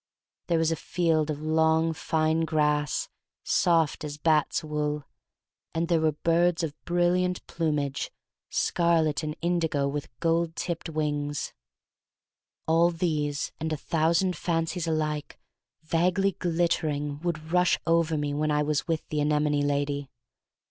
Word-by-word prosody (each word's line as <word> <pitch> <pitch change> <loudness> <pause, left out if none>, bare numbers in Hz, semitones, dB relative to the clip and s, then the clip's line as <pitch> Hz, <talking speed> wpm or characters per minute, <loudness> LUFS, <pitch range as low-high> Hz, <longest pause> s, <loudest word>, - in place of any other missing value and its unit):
There 170 - +2
was 160 0 +2
a - - +1
field 160 -1 0
of 150 0 -3
long, 160 +1 +2
fine 160 0 0
grass, 150 -2 +1 0.4
soft 165 -4 +2
as 150 -1 -5
bat's 155 -1 +2
wool, 150 -1 -2 0.7
and 165 +1 0
there 165 -2 +3
were 155 -1 +2
birds 170 +2 +2
of 155 -3 -2
brilliant 175 +1 +1
plum 160 -3 -1
age 140 -1 -2 0.2
— - - -65
scarlet 165 -3 +2
and 155 -1 -4
indigo 165 -5 +1
with 145 +1 -4
gold 165 0 +1
tipped 170 -1 -3
wings. 145 -2 -2 1.1
All 165 +2 +4
these 150 -4 -1
and 160 +1 -2
a 155 - -1
thousand 165 +4 +1
fancies 165 0 -1
alike 155 -2 -2 0.5
vaguely 180 +5 +2
glittering 155 -5 -1
would 160 -1 -4
rush 180 0 +4
over 165 -1 +2
me 145 -1 -1
when 155 +1 0
I 150 0 +2
was 150 0 -1
with 165 -2 -2
the 150 - -1
anemone 150 0 +2
lady. 145 -1 -1
160 Hz, 140 wpm, -27 LUFS, 150-170 Hz, 1.1 s, All